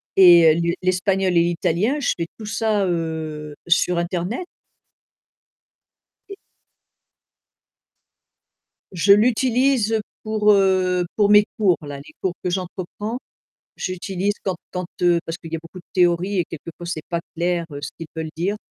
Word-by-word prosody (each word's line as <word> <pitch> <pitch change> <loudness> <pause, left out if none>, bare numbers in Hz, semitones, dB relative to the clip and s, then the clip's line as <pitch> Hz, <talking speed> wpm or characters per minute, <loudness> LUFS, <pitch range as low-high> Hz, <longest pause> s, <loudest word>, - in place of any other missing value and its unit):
et 170 -4 +8
heu, - - -1
lu 170 0 +1
l'espagnol 185 0 +1
et 170 - +6
l'italien, 175 - 0
je 280 - +1
fais 170 -1 -3
tout 220 - -7
ça 210 -1 0
heu, 160 -3 -3
sur 175 0 +2
internet. 180 - -2 1.8
Et 395 - -8 2.6
Je 190 +2 +5
l'utilise, 240 +1 +2 0.2
pour, 215 -1 +3
heu 185 -2 +2
pour 205 -2 +3
mes 210 0 +7
cours 195 -6 +3
là, 145 -2 -7
les 140 +2 -13
cours 185 - -1
que 180 - 0
j'entreprends, 185 +5 -4 0.6
j'utilise 190 +1 -2
quand 190 -2 -1 0.2
quand 180 -1 -3 0.2
heu 175 -1 +4
parce 165 +1 -4
qu'il 165 -2 -11
y - - -1
a - - -4
beaucoup 165 +3 -12
de - - -16
théories 180 +1 +2
et 175 - +1
quelque 165 +1 -9
fois 175 - -8
c'est 170 -2 -4
pas 170 - -1 0.2
clair, 170 0 0
heu, 145 - -6
ce - - -4
qu'ils 165 - -7
veulent 160 -1 -4
dire. 180 +6 -1
180 Hz, 155 wpm, -22 LUFS, 170-205 Hz, 2.6 s, et